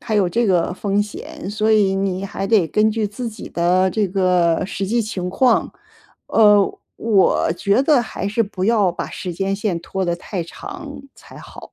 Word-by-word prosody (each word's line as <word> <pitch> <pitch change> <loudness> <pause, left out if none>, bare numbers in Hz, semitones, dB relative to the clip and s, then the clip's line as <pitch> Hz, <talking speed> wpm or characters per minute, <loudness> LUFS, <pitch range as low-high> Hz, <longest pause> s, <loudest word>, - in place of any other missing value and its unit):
还 220 - -3
有 195 -3 +3
这 230 +6 0
个 180 -2 +1
风 200 +1 0
险， 205 -1 -8
所 215 +1 +1
以 200 -3 +3
你 195 0 -2
还 195 0 -4
得 205 -5 +3
根 215 +6 +2
据 215 -1 -1
自 235 +4 -5
己 220 0 -9
的 180 +2 +2
这 210 +1 0
个 180 -2 +2
实 195 0 -4
际 235 +4 +1
情 185 -4 -4
况， 250 +6 +2 0.5
呃， 210 -2 +4 0.2
我 200 -6 +2
觉 200 +7 +1
得 280 -3 +3
还 195 -3 -4
是 215 +3 +1
不 200 -3 -4
要 210 -4 +3
把 - - -5
时 180 - -5
间 195 +3 -2
线 195 -5 -2
拖 190 +2 -3
得 175 -1 0
太 180 +1 -5
长 315 - -9
才 - - -15
好。 - - -12
200 Hz, 205 characters per minute, -20 LUFS, 185-220 Hz, 0.5 s, 呃